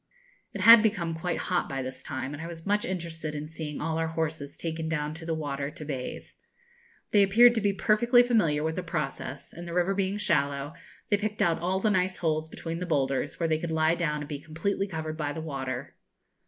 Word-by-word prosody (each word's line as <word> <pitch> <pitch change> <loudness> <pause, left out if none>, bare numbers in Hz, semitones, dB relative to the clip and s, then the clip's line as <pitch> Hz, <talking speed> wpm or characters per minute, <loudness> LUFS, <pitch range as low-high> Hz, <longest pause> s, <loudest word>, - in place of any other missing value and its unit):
It 200 - -5
had 230 +2 +10
become 185 -7 0
quite 165 +2 -2
hot 180 -1 -1
by 135 -1 -3
this 130 0 -6
time, 130 +2 -4
and 145 - -6
I 165 - -5
was 165 -1 -9
much 205 +1 +1
interested 165 -4 -4
in 150 +1 -4
seeing 155 -2 -6
all 160 +1 -1
our 165 - 0
horses 160 -3 -3
taken 160 -1 -3
down 150 -1 -1
to 165 +1 -8
the 165 - 0
water 140 -2 -3
to 150 - -9
bathe. 135 -4 -4 0.9
They 205 - +6
appeared 230 +5 +7
to 225 - 0
be 205 0 +3
perfectly 235 +5 +4
familiar 190 -12 +2
with 160 0 -1
the 185 - -2
process; 150 -5 -4
and, 170 +1 -8
the 170 - -5
river 180 +2 +2
being 195 0 0
shallow, 145 -6 0 0.4
they 205 - +5
picked 210 +1 -1
out 165 -1 +2
all 185 +3 0
the 215 +2 +2
nice 185 -1 +1
holes 160 -1 -1
between 165 +1 -5
the 180 - -4
boulders, 140 -2 0
where 165 - +1
they 155 -1 +1
could 170 0 -4
lie 160 0 +3
down 150 -4 -1
and 145 - -6
be 145 -2 -5
completely 165 +7 -2
covered 160 -3 -4
by 145 -2 -2
the 160 - -5
water. 135 -3 -5
165 Hz, 220 wpm, -28 LUFS, 150-185 Hz, 0.9 s, had